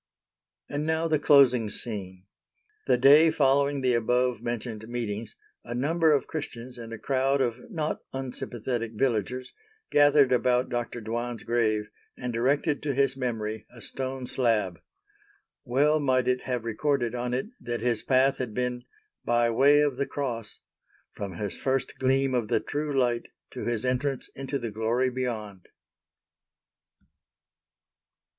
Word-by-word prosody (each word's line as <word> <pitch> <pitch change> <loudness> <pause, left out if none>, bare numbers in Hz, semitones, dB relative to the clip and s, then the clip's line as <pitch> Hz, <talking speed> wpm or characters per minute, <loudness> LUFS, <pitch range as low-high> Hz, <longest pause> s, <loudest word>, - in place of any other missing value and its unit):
And 145 +1 -3
now 160 +1 +1
the 155 -2 +2
closing 135 -7 +5
scene. 95 -5 -6 0.6
The - - +4
day 145 +6 +7
following 140 -1 +2
the 130 -1 +2
above 125 0 +1
mentioned 115 -2 -4
meetings, 115 -2 -4 0.3
a 120 - -6
number 160 +5 +2
of 145 - +2
Christians 125 -5 -6
and 115 -1 -8
a 115 - -5
crowd 135 +3 +1
of 125 - -2
not 160 -7 -2
unsympathetic 120 -3 -4
villagers, 125 +1 -1 0.4
gathered 145 -2 +5
about 125 0 +2
Dr. 120 -1 -3
Dwan's 120 +1 -4
grave 110 -3 0 0.3
and 125 -2 -4
erected 145 +5 +1
to 145 -3 -2
his 135 -1 +2
memory 110 -4 -3
a 120 - -14
stone 130 +1 -4
slab. 110 -9 0 0.8
Well 145 +5 +3
might 130 -3 +2
it 125 0 +1
have 125 -2 -1
recorded 120 +1 0
on 125 0 -2
it 130 +11 -3
that 120 -1 -4
his 120 -2 +1
path 135 +1 +3
had 120 -5 -4
been 125 0 -2 0.4
"by 120 0 +2
way 140 +5 +5
of 145 -4 +1
the 140 - -1
Cross," 115 -7 -4 0.5
from 100 -2 -5
his 100 0 -4
first 135 -1 -2
Gleam 135 0 +2
of 120 -4 0
the - - +2
true 150 0 -3
Light 120 -2 +1 0.2
to - - -6
his 120 0 -1
entrance 130 +1 -1
into 135 +1 -4
the 120 -4 -4
Glory 115 +4 0
beyond. 110 -7 -4
125 Hz, 145 wpm, -27 LUFS, 115-135 Hz, 0.8 s, day